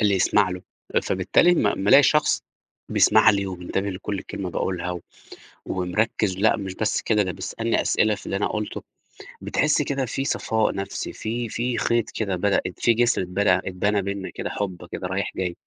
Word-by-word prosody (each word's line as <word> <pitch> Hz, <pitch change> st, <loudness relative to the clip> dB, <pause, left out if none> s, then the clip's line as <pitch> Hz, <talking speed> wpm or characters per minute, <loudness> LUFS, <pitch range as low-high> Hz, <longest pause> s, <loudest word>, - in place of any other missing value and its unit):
اللي 105 Hz, -2 st, +3 dB
يسمع 95 Hz, 0 st, +3 dB
له، 90 Hz, 0 st, -6 dB, 0.4 s
فبالتالي 95 Hz, -, +3 dB
أما 135 Hz, -12 st, +2 dB
لمّا 100 Hz, 0 st, -1 dB
الاقي 140 Hz, -, +9 dB
شخص 150 Hz, +2 st, +3 dB, 0.5 s
بيسمع 110 Hz, +1 st, +5 dB
لي 100 Hz, -2 st, 0 dB
ومنتبه 95 Hz, +2 st, -3 dB
لكل 95 Hz, +1 st, -4 dB
كلمة 95 Hz, -2 st, -5 dB
باقولها، 90 Hz, 0 st, -3 dB, 0.7 s
ومركز 95 Hz, +2 st, -1 dB
لأ 110 Hz, +3 st, +3 dB
مش 95 Hz, -3 st, -5 dB
بس 110 Hz, -, 0 dB
كده، 105 Hz, -2 st, +2 dB
ده 95 Hz, -2 st, -3 dB
بيسألني -, -, -2 dB
أسئلة 110 Hz, 0 st, +2 dB
في 100 Hz, -, -11 dB
اللي -, -, -2 dB
أنا 100 Hz, -, 0 dB
قُلته، 105 Hz, -1 st, -4 dB, 0.6 s
بتحس 150 Hz, 0 st, +1 dB
كده 140 Hz, -2 st, -1 dB
فيه 135 Hz, +3 st, -3 dB
صفاء 110 Hz, -5 st, 0 dB
نفسي، 100 Hz, 0 st, -4 dB
في، 115 Hz, +1 st, -4 dB
في 120 Hz, +2 st, -2 dB
خيط 115 Hz, 0 st, +1 dB
كده 100 Hz, -4 st, -2 dB
بدأت 90 Hz, 0 st, 0 dB
فيه 115 Hz, -, +3 dB
جسر 120 Hz, -1 st, +2 dB
اتبنى، 95 Hz, +1 st, +2 dB
اتبنى 95 Hz, +2 st, -1 dB
بينا 100 Hz, 0 st, -4 dB
كده -, -, -5 dB
حب 90 Hz, -4 st, -4 dB
كده 90 Hz, -, -4 dB
رايح 95 Hz, +2 st, -2 dB
جاي 90 Hz, -2 st, -3 dB
100 Hz, 175 wpm, -24 LUFS, 95-110 Hz, 0.7 s, الاقي